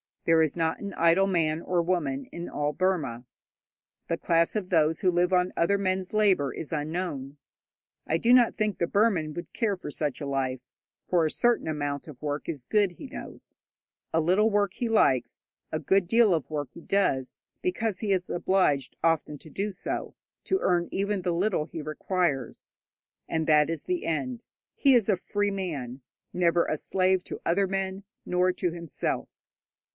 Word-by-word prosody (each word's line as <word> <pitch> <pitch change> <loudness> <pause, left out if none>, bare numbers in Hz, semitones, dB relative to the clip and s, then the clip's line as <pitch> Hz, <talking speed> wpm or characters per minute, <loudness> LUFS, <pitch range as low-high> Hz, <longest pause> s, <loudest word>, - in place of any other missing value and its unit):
There 165 -1 +5
is 160 -2 +1
not 165 -1 0
an 200 -2 -6
idle 170 +4 +4
man 165 -4 +1
or 180 -1 +1
woman 160 -6 -1
in 170 0 -6
all 145 0 -1
Burma. 150 -11 -1 0.8
The - - -1
class 165 +3 +2
of 195 -4 -2
those 160 -2 +3
who 185 - +3
live 175 +1 +2
on 180 0 +3
other 185 +4 +2
men's 185 -1 -1
labour 195 -10 +3
is 155 - -6
unknown. 150 -3 -3 0.7
I 160 - +2
do 235 +8 +4
not 245 -2 +5
think 215 -2 -1
the 170 - 0
Burman 190 -8 +2
would 170 +1 -8
care 220 -5 0
for 180 -5 -8
such 145 -2 -2
a - - -3
life, 130 -2 -1 0.5
for 175 -3 +3
a 155 - 0
certain 240 -6 +2
amount 145 -2 -3
of 145 -5 -11
work 145 -1 -3
is 145 -6 -4
good, 200 +6 +2
he 270 - -9
knows. - - -10 0.6
A 165 - +3
little 190 +7 +3
work 205 -2 +1
he 235 +1 -2
likes; 135 - +2 0.3
a - - -1
good 195 -2 +2
deal 225 -1 +5
of 160 -4 -1
work 145 -4 -3
he - - -11
does, 140 -10 0 0.2
because 225 - -1
he 210 -3 -1
is 185 -2 0
obliged 175 -7 +1
often 160 -2 +1
to 160 - -13
do 200 +7 -2
so 195 - -4 0.3
to 380 - +1
earn 175 -1 +2
even 200 0 -1
the 180 - 0
little 180 -2 +1
he 160 0 -7
requires. 155 -3 -2 0.6
And 160 -1 -1
that 150 -1 +5
is 165 -1 -3
the 360 -1 -2
end. 235 +9 -2 0.3
He 275 -2 +5
is 225 -3 +3
a 200 - +3
free 205 +3 -1
man, 145 -10 -4 0.3
never 175 -1 +2
a 155 - -1
slave 185 +2 +1
to - - -7
other 195 +3 +2
men, 195 0 -3 0.2
nor 180 +1 +2
to 180 -1 -1
himself. 170 -2 -3
175 Hz, 180 wpm, -27 LUFS, 155-195 Hz, 0.8 s, There